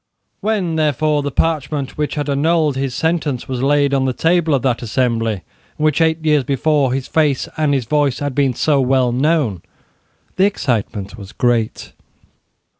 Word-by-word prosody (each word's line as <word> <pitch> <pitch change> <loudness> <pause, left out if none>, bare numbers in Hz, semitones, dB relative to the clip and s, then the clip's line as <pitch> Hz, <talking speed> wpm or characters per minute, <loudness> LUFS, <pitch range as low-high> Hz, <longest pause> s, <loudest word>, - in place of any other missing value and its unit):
When, 195 -7 -1
therefore, 150 0 +1
the 145 - -2
parchment 145 -1 -1
which 150 0 -3
annulled 150 +1 +1
his 135 -2 -2
sentence 160 -6 -1
was 130 -2 -3
laid 140 +1 +2
on 135 -1 +2
the 130 - 0
table 165 0 +2
of 130 - -2
that 125 -3 0
assembly 115 -1 0 0.4
in 155 - -1
which, 155 +1 +2
eight 160 0 +1
years 150 -3 +3
before, 140 0 +1
his 130 0 -2
face 150 -5 +1
and 155 -2 +1
his 130 -4 -1
voice 140 0 +1
had 145 -1 -3
been 135 -2 +1
so 145 +1 +2
well 130 -1 +2
known, 130 - +1 0.8
the 190 - +4
excitement 110 - -2
was 100 0 -10
great. 120 -3 -1
140 Hz, 165 wpm, -18 LUFS, 125-155 Hz, 0.8 s, the